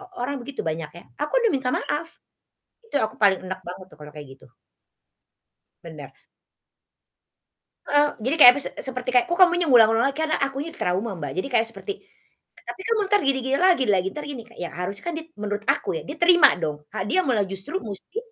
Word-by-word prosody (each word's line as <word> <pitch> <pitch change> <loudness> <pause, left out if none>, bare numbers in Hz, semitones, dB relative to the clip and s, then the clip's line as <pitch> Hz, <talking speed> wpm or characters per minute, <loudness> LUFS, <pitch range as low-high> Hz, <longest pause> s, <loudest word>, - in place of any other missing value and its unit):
o 385 - -12 0.2
orang 270 +3 -2
begitu 275 +2 -7
banyak 160 -1 -4
ya, 175 - -11 0.2
"Aku 295 - -3
udah 460 - +2
minta 260 -2 -1
maaf." 300 +3 -3 0.8
Itu 455 - -25
yang 220 - +1
aku - - -17
paling 195 -2 +4
enek 185 0 -5
banget 185 +1 -9
tuh - - -18
kalau 150 0 -11
kayak 145 -2 -10
gitu. - - -20 1.4
Bener. 155 -4 -10 1.8
Eee, 290 0 +4
jadi 260 +7 0
kayak 285 -6 +11
apa - - -2
sih, - - -1
se - - -6
seperti 255 0 -6
kayak, 250 +8 +4
"Kok 345 - +1
kamunya 350 -1 +5
ngulang-ngulang 225 -2 +5
lagi?" 275 - -11
Karena 310 - 0
akunya 275 +4 -3
trauma, 190 +5 -2
Mbak. 150 -3 -6
Jadi 190 +9 -3
kayak 230 -3 +1
seperti, 400 - -6 0.8
"Tapi - - -7
kamu 455 -1 +1
entar 410 0 +3
gini 275 -1 +2
gini 265 +1 +1
lagi, 355 -6 +3
lagi, 190 -2 +2
entar 300 - -7
gini 265 -5 -6 0.2
"Ya, 175 - -3
harus 180 +3 -4
kan, 345 - -3
did 325 0 -8
menurut 205 0 -4
aku 165 - -1
ya, - - -5
dia 295 - -6
terima 345 -3 +7
dong. 150 0 -4
Ha 190 - -3
dia 370 - +2
malah 220 -6 +1
justru 195 - -5
musti 210 - -8
250 Hz, 205 wpm, -23 LUFS, 190-300 Hz, 1.8 s, kayak